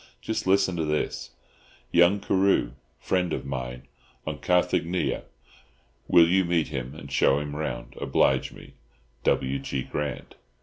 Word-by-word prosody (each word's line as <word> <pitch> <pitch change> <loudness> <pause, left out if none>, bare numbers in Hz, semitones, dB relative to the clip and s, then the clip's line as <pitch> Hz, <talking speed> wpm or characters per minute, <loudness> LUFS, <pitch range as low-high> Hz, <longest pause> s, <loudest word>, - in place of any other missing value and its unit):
Just 110 -3 -3
listen 95 -1 +3
to 80 - 0
this: 75 0 -2 0.6
'Young 85 +4 +5
Carew, 95 -9 +2 0.3
friend 90 -2 0
of - - -3
mine, 65 -2 -5 0.4
on - - -4
Carthaginia. 90 0 +1 0.8
Will 85 -1 +6
you 95 +2 +3
meet 85 -3 +1
him 65 -1 -5
and 70 -2 -10
show 70 - +3
him 75 0 -4
round; 80 +1 -4
oblige - - +2
me—W. 60 +2 -4
G. 65 -1 -3
Grant. 75 -1 -4
75 Hz, 130 wpm, -26 LUFS, 65-90 Hz, 0.8 s, Will